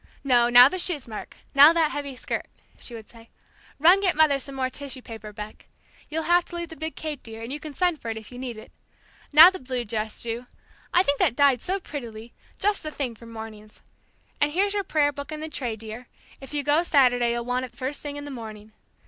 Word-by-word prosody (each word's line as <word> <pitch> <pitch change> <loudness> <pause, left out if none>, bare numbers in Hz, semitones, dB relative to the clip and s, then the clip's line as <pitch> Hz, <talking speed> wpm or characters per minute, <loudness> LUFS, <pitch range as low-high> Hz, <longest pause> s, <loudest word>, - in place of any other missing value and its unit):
"No, 240 -3 +4
now 245 +1 +9
the 370 +6 -3
shoes, 310 -8 0
Mark 215 -2 -8 0.2
now 285 +3 +9
that 325 -3 +2
heavy 285 -2 -5
skirt," - - -4 0.3
she 240 - -7
would 220 -2 -10
say. 230 -1 -17 0.5
"Run 345 +6 +6
get 375 -3 +2
mother 300 -3 +4
some 275 +1 -4
more 260 -1 -1
tissue 265 -2 -5
paper, 220 -2 -9
Beck. 210 0 -10 0.4
You'll 320 +1 -2
have 350 +1 +4
to - - -10
leave 340 -1 -5
the 320 - -9
big 315 0 -5
cape, 305 -3 -5
dear, 225 0 -9
and 240 +4 -5
you 295 - -5
can 300 -2 -9
send 355 -4 +1
for 230 - -5
it 225 - -3
if 220 +2 -10
you 245 - -9
need 250 -3 -5
it. 215 - -12 0.6
Now 320 +5 +10
the 375 - -7
blue 255 -2 -4
dress, 215 0 -3
Ju. 235 +1 -4 0.4
I 360 - +4
think 285 -5 0
that 235 - +2
dyed 275 -3 +4
so 385 +2 -2
prettily, 235 - -8 0.2
just 410 0 0
the 310 - -5
thing 275 -5 -3
for 230 +1 -14
mornings. 220 -2 -10 0.6
And 290 0 +3
here's 395 +5 +1
your 405 -1 0
prayer 295 -5 +2
book 285 +1 -8
in 305 - -5
the 315 +1 -5
tray, 245 -6 -3
dear; 225 +3 -9 0.3
if 270 - -11
you 295 -1 -1
go 295 +3 +3
Saturday 245 -7 +3
you'll 235 0 -3
want 250 +1 -1
it - - -11
the - - -26
first 265 +3 -4
thing 290 -1 -6
in 290 - -7
the 290 - -7
morning. 220 -4 -9
270 Hz, 240 wpm, -25 LUFS, 235-310 Hz, 0.6 s, Now